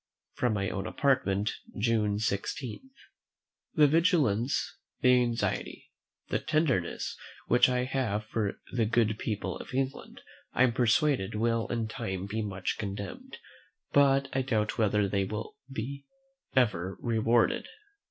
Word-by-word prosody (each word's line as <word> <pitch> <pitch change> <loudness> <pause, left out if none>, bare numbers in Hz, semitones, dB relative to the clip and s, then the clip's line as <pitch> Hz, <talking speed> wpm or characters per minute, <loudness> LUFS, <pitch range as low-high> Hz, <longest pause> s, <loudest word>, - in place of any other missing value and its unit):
From 125 -3 +1
my 100 -2 -1
own 95 0 -3
Apartment, 105 -7 +1 0.3
June 105 -2 +1
16. 110 - -3 0.9
The 150 - +7
vigilance, 145 - +2 0.2
the 125 - +6
anxiety, 120 -1 -2 0.4
the - - +1
tenderness, 150 - 0 0.3
which 120 +1 +5
I 125 0 +1
have 125 -5 -1
for 105 -2 -2
the 115 -3 +2
good 110 -2 +2
people 100 -4 -3
of - - -8
England, 135 +1 -3 0.3
I 130 - +4
am 125 -2 +3
persuaded, 125 - +2
will 115 +1 +1
in 115 -2 -2
time 105 -6 -4
be 110 +3 -3
much 95 -3 -3
commended; 100 -2 -6 0.5
but 135 -1 +4
I 135 - +2
doubt 110 -5 -1
whether 105 -2 +3
they 100 0 0
will 105 +6 -5
be 135 +3 -5 0.5
ever 95 -8 +1
rewarded. 115 0 +2
115 Hz, 130 wpm, -29 LUFS, 105-130 Hz, 0.9 s, The